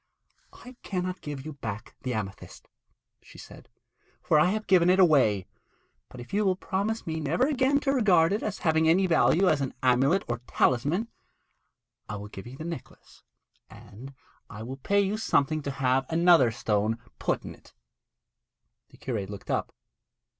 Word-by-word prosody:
'I 250 0 -14
cannot 185 -1 -4
give 145 -2 -7
you 155 - -6
back 110 -5 -7
the 125 -2 -3
amethyst,' 100 -3 -7 0.5
she - - -17
said, - - -13 0.5
'for 150 - +2
I - - +5
have 215 +2 -2
given 180 -2 +4
it 185 +1 +4
away; 130 - +4 0.6
but 125 - -12
if 120 - -11
you 210 +1 +2
will 190 -2 +2
promise 200 +4 -3
me 160 -1 -3
never 160 - +1
again 275 0 +2
to 275 - +1
regard 190 -8 +3
it 210 - -1
as 210 -1 -3
having 160 0 +3
any 185 +4 +4
value 175 +2 +3
as 150 -5 +2
an 135 - -3
amulet 135 +9 +3
or 120 -1 -3
talisman, 145 - +1 1.0
I 105 - -4
will 105 0 -8
give 95 +2 -10
you 130 +2 -10
the 155 - -7
necklace, 165 -6 -9 0.5
and 130 +7 -13 0.3
I 105 0 -8
will 130 +3 -7
pay 200 +9 +1
you 200 +2 -1
something 155 -7 +1
to 140 - -4
have 135 -1 0
another 165 -6 +5
stone 110 0 -1 0.2
put - - -1
in.' - - -10 1.3
The - - -19
curate 105 -7 -4
looked 100 -1 -7
up. - - -1
155 Hz, 170 wpm, -27 LUFS, 125-190 Hz, 1.3 s, I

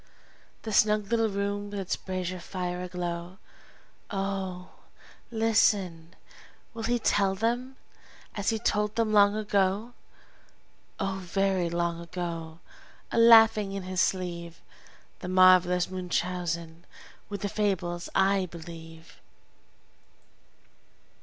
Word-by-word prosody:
The 220 - -4
snug 210 0 +3
little 225 -1 +2
room 200 0 -3
with 205 0 -5
its 190 -2 -2
brazier 185 -1 -4
fire 180 0 -4
aglow! 175 0 -5 0.7
Oh, 195 -2 -4 0.6
listen, 205 -7 +1 0.6
will 230 - -6
he 240 +2 +1
tell 200 -4 +1
them, 240 +5 -1 0.6
as 205 -1 -1
he 225 - 0
told 210 -1 0
them 225 -2 +1
long 205 0 +5
ago, 205 +2 0 1.1
Oh, 195 0 -2
very 190 -1 0
long 170 0 -1
ago, 170 -2 -6 0.5
a - - +1
laughing 225 -3 +6
in 195 -1 -4
his 185 0 -1
sleeve! 170 -2 -2 0.6
The 180 - -7
marvelous 185 -1 +5
Munchausen, 175 -2 -3 0.4
with 200 -2 -5
the 205 - -1
fables 185 -4 -2
I 195 -1 +3
believe? 165 -1 -11
190 Hz, 105 wpm, -28 LUFS, 175-205 Hz, 1.1 s, laughing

